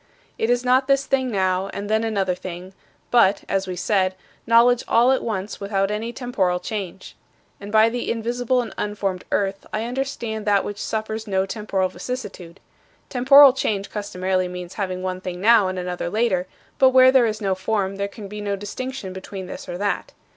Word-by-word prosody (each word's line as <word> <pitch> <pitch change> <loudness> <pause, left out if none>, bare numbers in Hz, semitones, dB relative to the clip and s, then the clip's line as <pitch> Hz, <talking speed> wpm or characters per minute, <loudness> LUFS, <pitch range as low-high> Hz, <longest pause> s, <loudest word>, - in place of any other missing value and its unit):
" - - -35
It 225 - 0
is 245 +1 +1
not 255 +2 +3
this 275 0 +3
thing 265 -1 0
now 190 -3 0
and 200 +1 -4
then 220 +1 +1
another 200 -5 0
thing, 180 +1 -8 0.4
but 220 -5 +4
(as 195 0 -1
we 185 - -4
said) 185 0 +1 0.3
knowledge 235 +1 +5
all 240 +3 +4
at 265 - +2
once 205 -3 -4
without 200 0 -1
any 220 +3 -3
temporal 205 -8 -1
change. 195 -2 -6 0.4
And 200 +1 -8
by 220 +1 +6
the 240 +1 -3
invisible 245 +2 0
and 230 - -8
unformed 200 -3 -3
earth, 195 -1 -1
I 215 - -2
understand 235 -3 -4
that 200 -1 +3
which 205 0 -5
suffers 220 0 -3
no 190 -1 +1
temporal 195 -2 -1
vicissitude. 185 -3 -7 0.5
Temporal 270 +1 +7
change 205 -6 -2
customarily 185 -3 -1
means 180 0 -7
having 185 -3 -3
one 185 0 -3
thing 180 -1 -5
now 215 0 +5
and 185 0 -3
another 180 -1 -3
later; 185 -3 0 0.3
but 265 - +7
where 260 0 +7
there 260 -3 +5
is 215 -1 -3
no 195 -3 0
form 195 0 -2
there 200 0 -1
can 200 0 -10
be 210 +1 -7
no 200 -1 -1
distinction 205 +1 -6
between 190 0 -7
this 180 - -8
or 175 - -4
that. 200 +1 -2
205 Hz, 190 wpm, -22 LUFS, 190-235 Hz, 0.5 s, Temporal